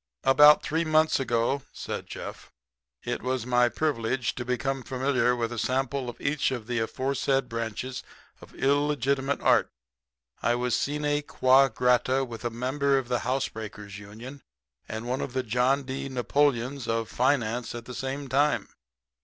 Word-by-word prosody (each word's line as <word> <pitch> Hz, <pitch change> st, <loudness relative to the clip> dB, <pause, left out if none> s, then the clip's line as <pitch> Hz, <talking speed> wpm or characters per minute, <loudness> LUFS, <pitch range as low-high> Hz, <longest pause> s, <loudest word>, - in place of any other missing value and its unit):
"About 150 Hz, +3 st, +7 dB
three 160 Hz, +2 st, 0 dB
months 155 Hz, -1 st, +3 dB
ago," 120 Hz, +1 st, 0 dB
said -, -, -6 dB
Jeff, -, -, -8 dB, 0.5 s
"it -, -, -3 dB
was 130 Hz, -2 st, -2 dB
my 125 Hz, -1 st, +3 dB
privilege 130 Hz, -4 st, -1 dB
to 120 Hz, -, -5 dB
become 130 Hz, +2 st, -2 dB
familiar 130 Hz, -1 st, +1 dB
with 115 Hz, -1 st, -2 dB
a 120 Hz, -, -4 dB
sample 130 Hz, +2 st, -1 dB
of 120 Hz, -, -9 dB
each 140 Hz, 0 st, 0 dB
of 125 Hz, -4 st, -4 dB
the 120 Hz, 0 st, -1 dB
aforesaid 135 Hz, +3 st, 0 dB
branches 115 Hz, +2 st, -4 dB, 0.4 s
of -, -, -15 dB
illegitimate 140 Hz, -1 st, +1 dB
art. -, -, +4 dB, 0.7 s
I 120 Hz, -, +2 dB
was 125 Hz, 0 st, 0 dB
sine 145 Hz, 0 st, 0 dB
qua 135 Hz, -1 st, +4 dB
grata 125 Hz, +2 st, +2 dB
with 115 Hz, -2 st, -9 dB
a 120 Hz, -, 0 dB
member 135 Hz, +4 st, 0 dB
of 130 Hz, -2 st, -3 dB
the 125 Hz, -1 st, +1 dB
housebreakers' 110 Hz, -5 st, -4 dB
union 115 Hz, +7 st, -10 dB, 0.5 s
and 110 Hz, +1 st, -5 dB
one 130 Hz, +2 st, -1 dB
of 125 Hz, -, -4 dB
the 130 Hz, 0 st, -1 dB
John 125 Hz, +4 st, +1 dB
D. 135 Hz, +1 st, -5 dB
Napoleons 130 Hz, 0 st, 0 dB
of 115 Hz, -1 st, -1 dB
finance 120 Hz, -2 st, 0 dB
at 120 Hz, 0 st, -7 dB
the 125 Hz, -, -8 dB
same 135 Hz, +2 st, -4 dB
time." 140 Hz, +3 st, +1 dB
130 Hz, 155 wpm, -27 LUFS, 120-140 Hz, 0.7 s, About